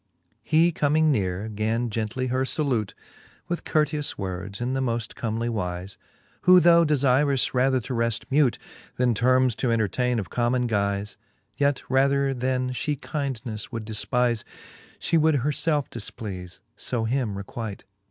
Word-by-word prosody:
XX. - - -45
He 165 +2 +5
comming 155 0 +2
neare, 95 -4 -1
gan 110 +2 -1
gently 110 +4 -2
her 130 +1 +1
{alute 125 -10 0 0.5
With 175 -1 -3
courteous 150 -1 0
words, 95 +1 -5
in 120 +2 -1
the 135 - 0
moft 120 -3 -2
Comely 115 0 -2
wize 90 -4 -3
j - - -14 0.4
Who 180 0 +7
though 170 0 +6
defirous 140 -2 +3
rather 130 +1 +3
to 125 - -5
reft 115 -2 0
mute, 135 -5 +3 0.4
Then 125 -1 +3
termes 130 +2 +3
to 125 - 0
entertaine 115 +3 +1
of 100 -6 -4
common 125 +1 +1
guize, 100 -2 -1 0.4
Yet 140 -1 +1
rather 135 +1 +2
then 130 0 -1
{he 145 +4 -2
kindneile 130 -7 -4
would 115 -3 -5
defpize, 115 +2 0 0.5
She 165 - +1
would 155 0 +3
her 140 +2 +1
lelfe 150 -1 0
difpleaie, 95 -5 -7 0.3
{o 115 -2 +1
him 115 -4 -1
requite. 100 +1 -6
125 Hz, 150 wpm, -25 LUFS, 110-140 Hz, 0.5 s, Who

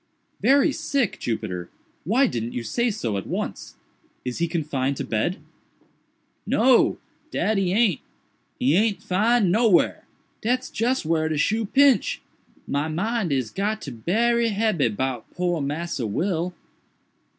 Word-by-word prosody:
"Very 280 +3 +4
sick, 275 - -1
Jupiter!—why 115 - -2
didn't 120 - -3
you 120 - -3
say 235 - 0
so 120 - -2
at 95 - -5
once? - - -4 0.5
Is 125 +3 -3
he 170 - +1
confined 140 -5 -1
to - - -3
bed?" 115 - -1 1.1
"No, 245 +2 +4 0.3
dat 215 -2 0
he 185 -2 +1
aint!—he 185 - -1
aint 210 +1 +1
'fin'd 210 +1 +2
nowhar—dat's 230 +4 0
just 240 -2 0
whar 160 0 +1
de 155 - -1
shoe 215 +8 +1
pinch—my 220 - 0
mind 195 +3 -1
is 130 -5 -1
got 210 +2 -1
to 140 - -6
be 120 - -10
berry 235 +4 +3
hebby 210 - +1
'bout 125 +2 -3
poor 175 -3 0
Massa 145 -3 -3
Will." 175 - -1
180 Hz, 130 wpm, -24 LUFS, 140-225 Hz, 1.1 s, Very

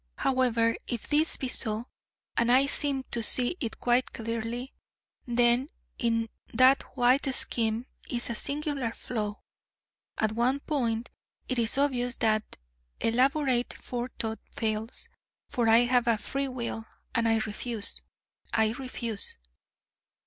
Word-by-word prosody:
However, 235 -3 +2
if 235 -3 -4
this 305 +2 +2
be 265 - -3
so 220 -2 +1 0.5
and 235 +1 +2
I 260 +2 +6
seem 275 -1 0
to 235 - 0
see 245 +7 +5
it 230 -6 -4
quite 245 +1 +1
clearly 230 +3 -4 0.5
then 240 +3 +3 0.3
in 230 -2 +1 0.2
that 255 +3 +5 0.2
White 255 +3 +3
scheme 225 0 +1 0.2
is 240 -2 -1
a - - -1
singular 280 -1 -1
flaw: 210 -4 -4 0.8
at 215 -1 +1
one 245 +5 +1
point, 240 -7 -2 0.4
it 255 -2 -1
is 230 +2 +1
obvious, 250 -3 +1
that 215 -1 0 0.4
elaborate 255 +1 +1
Forethought 240 -2 -5
fails: 220 +1 -3 0.4
for 235 -2 0
I 225 +1 +7
have 245 0 +2
a 230 -2 +3
free 275 +6 -2
will 235 -3 -5 0.3
and 230 -1 +1
I 225 - +4
refuse, 220 0 -2 0.5
I 220 -1 +2
refuse. 235 - +1
240 Hz, 125 wpm, -28 LUFS, 225-255 Hz, 0.8 s, I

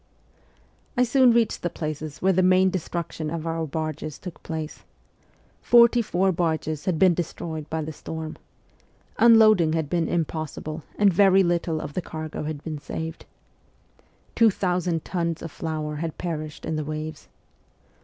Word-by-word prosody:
I 250 - +5
soon 250 0 +5
reached 230 -1 +2
the 175 - -1
places 155 -1 -5
where 190 0 +4
the 185 - +3
main 185 +1 +4
destruc 170 -2 -3
tion 155 -1 -4
of 165 0 -4
our 165 -1 -2
barges 155 0 -4
took 180 -3 -9
place. 160 -1 -6 0.8
Forty 235 0 +6
four 190 -3 +1
barges 160 -3 -1
had 180 -4 +1
been 185 +1 +5
destroyed, 160 -2 -5
by 160 0 -2
the 155 +1 -6
storm. 160 +1 -6 0.8
Unloading 215 -8 +6
had 160 -3 -2
been 170 -2 +1
impossible, 155 -1 -3 0.2
and 200 -2 +4
very 195 +1 +5
little 170 -2 0
of 150 -1 -6
the 185 - -2
cargo 155 -2 -6
had 150 -1 -5
been 155 -2 -5
saved. 160 +3 -6 1.1
Two 230 -1 +5
thousand 180 -4 -1
tons 170 -3 -2
of 165 - -6
flour 155 -2 -4
had 160 0 -4
perished 155 -3 -5
in 160 -1 -2
the 155 - -2
waves. 155 +1 -6
165 Hz, 155 wpm, -25 LUFS, 155-185 Hz, 1.1 s, Forty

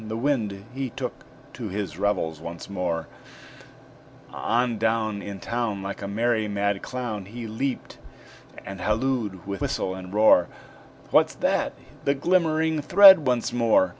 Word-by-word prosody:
The 110 +1 -4
Wind 110 -7 -1
he 135 0 -3
took 125 +1 -4 0.4
to - - -6
his 95 -4 -4
revels 95 -6 0
once 85 +1 -8
more; 85 -4 -2 1.2
On 120 -1 0
down, 110 -2 0
In 100 -1 -7
town, 115 -2 -2
Like 100 +1 -5
a 100 - -4
merry 110 +1 0
mad 100 -1 -1
clown, 120 -6 -5
He 115 +4 -8
leaped 125 +5 -4 0.7
and 95 -1 -7
hallooed 110 -4 -1
with 100 -1 -5
whistle 95 - -1
and 95 -1 -8
roar 105 -4 +5 0.6
"What's - - +4
that?" - - 0 0.3
The 140 - +2
glimmering 160 -1 +1
thread 190 -2 +8
once 125 -1 0
more! 115 -6 +3
110 Hz, 140 wpm, -25 LUFS, 100-125 Hz, 1.2 s, thread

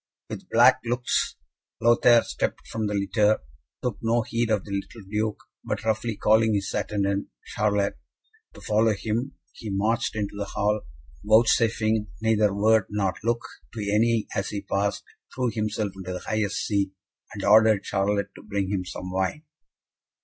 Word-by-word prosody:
With - - -7
black - - +6
looks, 120 +1 0 0.4
Lothaire 120 0 +5
stepped - - -3
from 110 -1 -2
the 105 - -2
litter, 105 +2 +2 0.4
took 125 -5 -2
no 115 +1 +1
heed 115 +1 -1
of 105 -3 +1
the 100 - -9
little 100 +1 -5
Duke, 105 +1 -1 0.3
but, - - -3
roughly 110 0 0
calling 110 0 +3
his 100 -1 -2
attendant, 100 -1 -1 0.3
Charlot, 105 -1 +1 0.6
to - - -12
follow 110 0 +2
him, 110 +6 -3 0.2
he 110 - -8
marched 110 +5 0
into 105 -2 -3
the 100 0 -3
hall, 105 +1 0 0.4
vouchsafing 110 0 +3
neither 110 -2 +2
word 105 +1 +3
nor 100 -3 0
look 120 +1 0 0.3
to - - -5
any 115 +1 +2
as 95 - -1
he 100 - -4
passed, 100 +1 -1 0.3
threw 125 -2 0
himself 110 -1 -2
into 95 -1 -6
the 90 - -4
highest 105 -2 -1
seat, 100 -2 0 0.4
and 100 - -6
ordered 110 0 +5
Charlot 100 +1 -1
to - - -13
bring 100 -2 -3
him 95 -3 -1
some 90 0 -7
wine. 95 - -1
105 Hz, 155 wpm, -25 LUFS, 100-110 Hz, 0.6 s, black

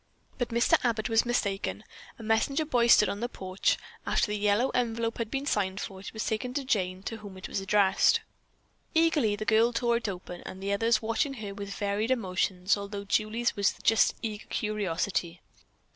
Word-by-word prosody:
But 245 - -1
Mr. 235 0 +3
Abbott 230 -2 0
was 225 +1 +3
mistaken. 200 -5 -1 0.3
A 230 - -10
messenger 225 +8 +1
boy 245 -5 +2
stood 210 -3 +7
on 200 - -3
the 240 +2 -2
porch. 185 -4 -1 0.3
After - - +1
the - - 0
yellow 210 +5 +2
envelope 230 -2 -1
had 230 -2 -2
been 275 +3 -3
signed 195 -7 0
for, 195 -2 -6
it 195 - -8
was 220 - -4
taken 250 +3 -2
to 280 - -1
Jane, 185 -6 -1
to 225 +1 -4
whom 205 -3 -10
it 185 - -7
was - - -2
addressed. 195 0 +3 0.7
Eagerly 315 -10 +3
the 215 +1 -5
girl 225 +2 +4
tore 235 0 +1
it 235 -3 -3
open, 180 -2 -7 0.2
the 200 +1 -1
others 225 +2 +2
watching 250 +5 0
her 210 -4 -6
with 200 0 -6
varied 205 +3 -1
emotions, 190 -5 +1
although 200 0 -6
Julie's 220 +4 0
was 200 -1 +1
just 225 - +4
eager 215 -1 -5
curiosity. 185 -4 -2
215 Hz, 185 wpm, -28 LUFS, 200-235 Hz, 0.7 s, stood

